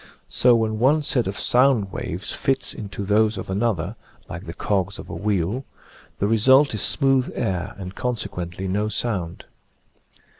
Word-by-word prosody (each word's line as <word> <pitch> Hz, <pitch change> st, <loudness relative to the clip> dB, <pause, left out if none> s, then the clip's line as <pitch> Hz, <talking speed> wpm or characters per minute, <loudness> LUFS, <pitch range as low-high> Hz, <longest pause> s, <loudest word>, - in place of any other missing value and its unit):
So 125 Hz, -1 st, +4 dB
when 110 Hz, -1 st, 0 dB
one 145 Hz, +6 st, +3 dB
set 135 Hz, -7 st, +1 dB
of 95 Hz, -, -4 dB
sound 125 Hz, -6 st, +3 dB
waves 90 Hz, +2 st, -4 dB
fits 135 Hz, 0 st, 0 dB
into 100 Hz, -2 st, -6 dB
those 105 Hz, +1 st, +2 dB
of 95 Hz, -, -5 dB
another, 100 Hz, -2 st, -1 dB, 0.3 s
like 85 Hz, +3 st, -8 dB
the 85 Hz, -, -5 dB
cogs 100 Hz, -2 st, -1 dB
of -, -, -9 dB
a -, -, -5 dB
wheel, 105 Hz, +4 st, -1 dB, 0.5 s
the -, -, 0 dB
result 130 Hz, +6 st, +5 dB
is 105 Hz, -, -1 dB
smooth 135 Hz, -2 st, +2 dB
air 95 Hz, -2 st, -2 dB
and 95 Hz, -1 st, -7 dB
consequently 95 Hz, -6 st, -3 dB
no 105 Hz, +3 st, 0 dB
sound. 100 Hz, -6 st, -2 dB
105 Hz, 155 wpm, -23 LUFS, 95-120 Hz, 0.5 s, result